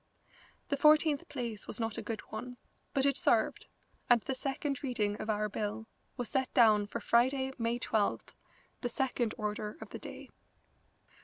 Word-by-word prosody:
The 280 - +1
fourteenth 300 0 +4
place 240 -7 -4
was 215 - -3
not 225 -1 -1
a - - -3
good 220 0 -4
one, 245 +3 -6 0.3
but 270 0 +2
it 280 -1 +3
served, - - +2 0.4
and 245 -1 +7
the 265 - -2
second 275 +1 -2
reading 220 -7 0
of 220 - -5
our 210 0 +1
bill 210 +1 -3 0.3
was 245 -3 -3
set 265 -1 0
down 215 -4 +6
for 235 - -4
Friday, 265 +4 +2
May 230 +1 0
12th, 220 -4 0 0.5
the 245 - -1
second 245 -2 -1
order 210 +1 -3
of - - -9
the - - -7
day. - - -9
235 Hz, 165 wpm, -32 LUFS, 215-265 Hz, 0.5 s, and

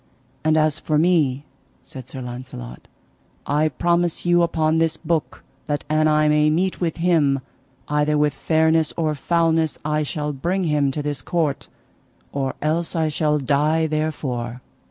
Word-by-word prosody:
And 155 0 +3
as 155 -1 +2
for 155 - 0
me, 150 -5 +2 0.4
said 130 -5 -11
Sir 130 0 -7
Launcelot, 120 - -8 0.6
I 150 +2 +1
promise 170 +4 0
you 175 0 +4
upon 160 -1 +1
this 165 -1 +1
book 165 -1 -2 0.2
that 145 -1 -2
an 155 0 +3
I 155 0 +3
may 150 0 +4
meet 180 +5 0
with 170 -2 -1
him, 160 -6 +2 0.5
either 150 0 +1
with 150 -1 +2
fairness 160 +1 +2
or 155 -2 +1
foulness 165 +1 +1
I 150 0 +1
shall 150 0 -3
bring 175 +8 -1
him 150 -4 +1
to 145 +2 -3
this 145 -2 -3
court, 155 -3 -1 0.6
or 135 -2 -2
else 160 +3 0
I 160 -1 +1
shall 150 0 +1
die 150 +3 +1
therefore. 135 -6 -3
155 Hz, 155 wpm, -22 LUFS, 145-160 Hz, 0.6 s, you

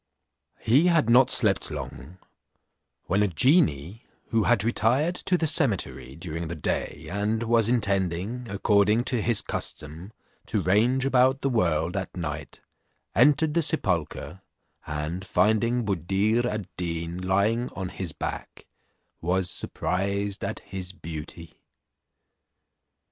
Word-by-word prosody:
He 140 +10 +4
had 160 -9 +3
not 125 +2 +6
slept 105 -7 +3
long, 70 +2 -8 0.9
when 95 +3 0
a 105 - +3
genie, 95 - +2 0.3
who 115 -3 +1
had 115 -4 +3
retired 120 +8 +1
to 180 - 0
the 165 - 0
cemetery 90 - 0
during 85 0 -5
the 85 - -5
day, 75 - -3
and 105 +3 -1
was 115 -1 +2
intending, 100 +1 -1
according 100 +3 +2
to 125 -2 -1
his 115 -1 +4
custom, 80 +7 -6 0.4
to - - -1
range 120 +8 +2
about 130 0 +3
the 135 - 0
world 85 -6 +1
at 95 -1 -4
night, 75 -3 -6 0.5
entered 150 +6 +4
the 170 - +2
sepulchre, 95 - -2 0.5
and 75 +5 -4
finding 110 +5 +1
Buddir 100 +5 +1
ad 105 -4 -3
Deen 85 0 -3
lying 100 +6 +1
on 95 -1 -4
his 95 -3 -4
back, - - -6 0.6
was 90 +1 0
surprised 100 +3 -2
at - - -4
his 95 -2 -7
beauty. 80 -1 -8
100 Hz, 125 wpm, -26 LUFS, 85-120 Hz, 0.9 s, not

